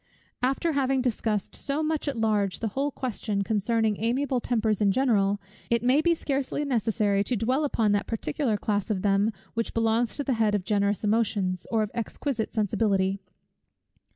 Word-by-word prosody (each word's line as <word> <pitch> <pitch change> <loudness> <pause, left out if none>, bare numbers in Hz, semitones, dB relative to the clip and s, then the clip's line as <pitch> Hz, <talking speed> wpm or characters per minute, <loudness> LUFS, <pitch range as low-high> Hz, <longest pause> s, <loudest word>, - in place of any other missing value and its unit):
After 270 +6 +1
having 270 -3 +1
discussed 220 -4 -1
so 290 +2 -1
much 310 -1 -1
at 275 -4 -1
large 210 -4 +1
the 225 - -1
whole 275 +7 -1
question 215 -6 -2
concerning 220 +1 +1
amiable 255 +2 +1
tempers 220 -3 0
in 200 -1 +4
general, 205 -5 +2 0.3
it 235 -1 +1
may 260 +5 +4
be 340 +1 +3
scarcely 280 -1 -2
necessary 215 -5 +1
to 245 - -1
dwell 250 +7 +1
upon 225 -7 +1
that 205 0 0
particular 225 0 -1
class 205 -1 -1
of 195 -4 -1
them 200 +2 +3 0.2
which 230 0 -2
belongs 225 +1 +1
to 285 - -1
the 270 - 0
head 220 -2 +2
of 200 - -1
generous 205 0 +1
emotions, 205 -4 0
or 225 -2 +2
of 210 - -4
exquisite 235 +1 -3
sensibility. 200 -2 +1
225 Hz, 170 wpm, -27 LUFS, 205-255 Hz, 0.3 s, in